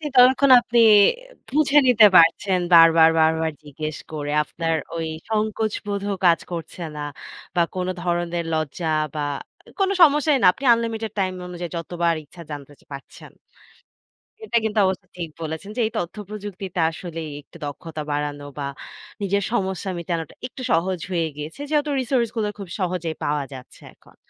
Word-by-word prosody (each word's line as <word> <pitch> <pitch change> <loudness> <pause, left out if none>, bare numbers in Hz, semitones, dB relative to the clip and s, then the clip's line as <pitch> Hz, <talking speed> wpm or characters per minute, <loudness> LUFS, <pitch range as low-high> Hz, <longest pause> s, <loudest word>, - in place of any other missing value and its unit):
ততক্ষণ 260 +2 +6
আপনি 235 0 +1 0.7
বুঝে 295 0 +3
নিতে 225 -3 +7
পারছেন 180 +3 +4 0.2
বারবার, 165 -1 +8
বারবার 160 0 +2
জিজ্ঞেস 155 +1 -6
করে 145 -2 -4
আপনার 165 +1 -2 0.2
ওই 165 -1 -2 0.2
সংকোচ 215 0 -1
বোধ 200 -1 -2 0.2
কাজ 170 -1 +5
করছে 170 +1 -6
না 150 - -5 0.5
বা 175 - +3
কোন 185 0 -2
ধরনের 175 -1 -1
লজ্জা 155 +1 -2 0.2
বা 150 - -2 0.6
কোন 385 - +2
সমস্যাই 295 -2 +5
না। - - +4
আপনি 275 - -8
unlimited 225 -1 -2
time 185 -1 0
অনুযায়ী 175 -1 -6
যতবার 170 0 -1
ইচ্ছা 170 +4 -14
জানতে 145 0 -8 0.2
পারছেন। 140 - -11 1.1
এটা 235 - +1
কিন্তু 220 0 -2
অবশ্য 190 +1 -1
ঠিক 170 -2 -4
বলেছেন 160 +4 -5
যে - - -1
এই 220 - -2
তথ্যপ্রযুক্তিতে 195 -1 -6
আসলে 165 0 -7 0.2
একটু - - -17
দক্ষতা 155 +2 -6
বাড়ানো 145 0 -3
বা 140 - -3 0.5
নিজের 200 0 0
সমস্যা 190 -4 -1
মেটানোটা 170 -2 -4
একটু 260 - -11
সহজ 180 +2 +1
হয়ে 170 -3 0
গেছে। 150 - -7
যেহেতু 300 -1 +1
resource 240 -3 0
গুলো 215 -2 0
খুব 195 - -7
সহজেই 175 -3 -2
পাওয়া 145 -1 0
যাচ্ছে 130 -1 -12
এখন। - - -23
175 Hz, 150 wpm, -23 LUFS, 160-215 Hz, 1.1 s, বারবার